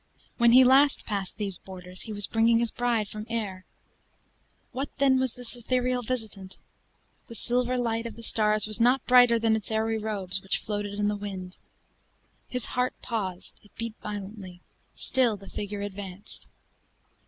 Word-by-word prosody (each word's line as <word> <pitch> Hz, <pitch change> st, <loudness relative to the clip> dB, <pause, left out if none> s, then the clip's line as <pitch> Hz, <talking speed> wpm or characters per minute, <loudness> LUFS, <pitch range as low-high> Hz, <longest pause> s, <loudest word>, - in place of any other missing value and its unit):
When 235 Hz, 0 st, +6 dB
he 260 Hz, +1 st, +9 dB
last 275 Hz, +3 st, +5 dB
passed 200 Hz, -3 st, -3 dB
these 200 Hz, -4 st, -4 dB
borders, 185 Hz, -1 st, -8 dB
he 220 Hz, -, -7 dB
was 205 Hz, -1 st, -1 dB
bringing 230 Hz, +2 st, +3 dB
his 235 Hz, -1 st, +1 dB
bride 240 Hz, -4 st, 0 dB
from 215 Hz, +1 st, -7 dB
Ayr! 205 Hz, -5 st, -3 dB, 1.1 s
What 270 Hz, +3 st, -3 dB
then 265 Hz, -1 st, +4 dB
was 260 Hz, -2 st, 0 dB
this 245 Hz, -1 st, -6 dB
ethereal 250 Hz, +1 st, 0 dB
visitant? 215 Hz, -6 st, -5 dB, 0.7 s
The 230 Hz, -, -9 dB
silver 250 Hz, +2 st, 0 dB
light 230 Hz, -1 st, -1 dB
of 230 Hz, -, -9 dB
the 230 Hz, -, -11 dB
stars 215 Hz, -2 st, +2 dB
was 215 Hz, +1 st, 0 dB
not 245 Hz, +3 st, +4 dB
brighter 245 Hz, -2 st, +7 dB
than 225 Hz, -1 st, +3 dB
its 220 Hz, -, -4 dB
airy 220 Hz, 0 st, 0 dB
robes, 195 Hz, -3 st, -2 dB
which 195 Hz, -, +1 dB
floated 205 Hz, -1 st, -3 dB
in 205 Hz, 0 st, +1 dB
the 210 Hz, -, +1 dB
wind. 190 Hz, -3 st, -6 dB, 0.9 s
His 250 Hz, -2 st, -3 dB
heart 250 Hz, 0 st, +1 dB
paused 190 Hz, -6 st, -4 dB
it 210 Hz, -, -23 dB
beat 230 Hz, -1 st, -4 dB
violently 195 Hz, -3 st, -7 dB, 0.3 s
still 245 Hz, -5 st, +1 dB
the 195 Hz, 0 st, -13 dB
figure 205 Hz, 0 st, -4 dB
advanced. 200 Hz, -1 st, -8 dB
220 Hz, 165 wpm, -27 LUFS, 205-245 Hz, 1.1 s, he